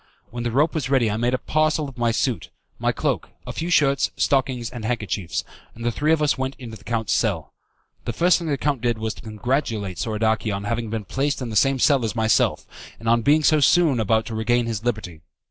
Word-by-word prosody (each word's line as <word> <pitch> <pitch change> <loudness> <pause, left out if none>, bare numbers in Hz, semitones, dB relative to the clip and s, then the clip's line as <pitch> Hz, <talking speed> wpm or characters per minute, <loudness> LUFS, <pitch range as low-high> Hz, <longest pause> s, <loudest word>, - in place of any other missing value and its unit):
When 120 - -5
the 120 - -1
rope 145 +7 +2
was 155 -4 -2
ready 125 -6 +3
I 105 - -1
made 120 +2 +1
a - - 0
parcel 155 +1 0
of 135 - -10
my 120 -1 +1
suit, 115 +1 -1 0.3
my - - +1
cloak, - - -2 0.2
a - - -6
few 165 - -3
shirts, 140 -5 +3
stockings, 130 -4 0
and 120 -3 -7
handkerchiefs, 105 -5 -2 0.3
and 115 +1 -7
the 120 - +2
three 150 +6 0
of 160 -1 +3
us 145 - +1
went 130 +1 -2
into 115 -3 -8
the 105 - -15
count's 115 -3 -1
cell. - - -1 0.5
The 120 - -1
first 175 +10 +3
thing 170 - -5
the 145 -2 0
count 140 -4 -1
did 120 -2 0
was 110 0 -3
to - - -13
congratulate 110 - -2
Soradaci 110 0 0
on 100 0 -3
having 115 +2 -2
been 110 -1 -4
placed 140 +5 -1
in 125 -3 -4
the - - -5
same 135 +4 +3
cell 135 0 +3
as 110 0 -2
myself, 110 -2 +2 0.3
and 115 - -7
on 115 +1 +4
being 150 +6 +3
so 155 0 +4
soon 150 -2 +4
about 110 0 +2
to 115 - -6
regain 120 +2 +1
his 110 -2 -3
liberty. 110 -9 -3
120 Hz, 230 wpm, -23 LUFS, 110-140 Hz, 0.5 s, on